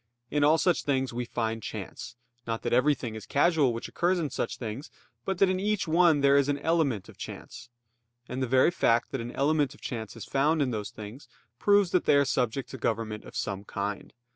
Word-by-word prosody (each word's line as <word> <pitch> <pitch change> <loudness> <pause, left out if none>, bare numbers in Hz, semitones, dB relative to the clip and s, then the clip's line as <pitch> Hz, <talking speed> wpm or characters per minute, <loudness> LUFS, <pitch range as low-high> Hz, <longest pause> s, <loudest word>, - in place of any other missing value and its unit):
In 145 -1 +2
all 155 +2 +5
such 175 0 +2
things 135 -3 -1
we 120 +1 -3
find 115 -1 -2
chance: 110 +3 -7 0.3
not 115 0 -3
that - - -1
everything 130 -2 +2
is 110 -2 -8
casual 145 -3 +3
which 115 0 -5
occurs 180 +2 +1
in 155 -6 -2
such - - -3
things; 120 +4 -6 0.4
but 190 -1 -1
that 195 - +5
in 185 0 0
each 210 -1 0
one 165 -2 +4
there 140 0 +5
is 140 0 +2
an 145 - +1
element 145 - 0
of - - -15
chance. - - -9 0.6
And 130 +1 -4
the 130 - 0
very 130 +7 +4
fact 115 -8 +2
that - - -3
an 120 +1 -6
element 145 0 +1
of - - -21
chance 110 -3 -5
is 115 - -8
found 150 +4 +1
in 135 -4 +1
those 105 -3 -3
things 110 +4 -10 0.3
proves 205 -3 +4
that 180 - +2
they - - +5
are 140 0 +4
subject 130 -1 -1
to 130 - -8
government 110 -2 -2
of - - -12
some 100 -1 -3
kind. 100 0 -4
135 Hz, 215 wpm, -28 LUFS, 115-155 Hz, 0.6 s, all